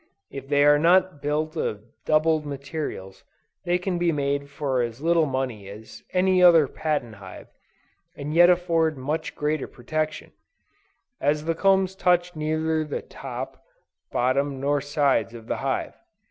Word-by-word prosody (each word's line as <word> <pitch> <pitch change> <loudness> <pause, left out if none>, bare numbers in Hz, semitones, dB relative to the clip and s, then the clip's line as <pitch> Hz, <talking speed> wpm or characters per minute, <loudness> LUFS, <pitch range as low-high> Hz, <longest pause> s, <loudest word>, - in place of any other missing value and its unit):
If 135 -1 -8
they 145 0 +4
are 145 0 +6
not 175 -1 +3
built 155 +2 -1
of 105 0 -3 0.2
doubled 155 0 +3
materials 140 - -6 0.4
they 175 +1 +2
can 180 -1 -3
be 175 -1 +2
made 140 -1 -1
for 135 -3 -1
as 115 0 -4
little 165 0 +2
money 130 -7 -3
as 105 +2 -11
any 185 0 +3
other 165 -5 +7
patent 130 -8 -3
hive, 95 -2 -11 0.7
and 145 +2 -5
yet 175 +2 +7
afford 165 -3 +2
much 145 +5 -3
greater 150 -1 -1
protection; 155 +5 -4 0.9
as 150 +2 0
the 165 - +1
combs 190 +2 +2
touch 180 -2 +1
neither 155 +1 -1
the 150 - -5
top, 135 0 -8 0.5
bottom 135 +2 0
nor 145 +1 0
sides 140 -6 0
of 115 -1 -10
the - - -3
hive. - - -2
150 Hz, 145 wpm, -24 LUFS, 135-165 Hz, 0.9 s, other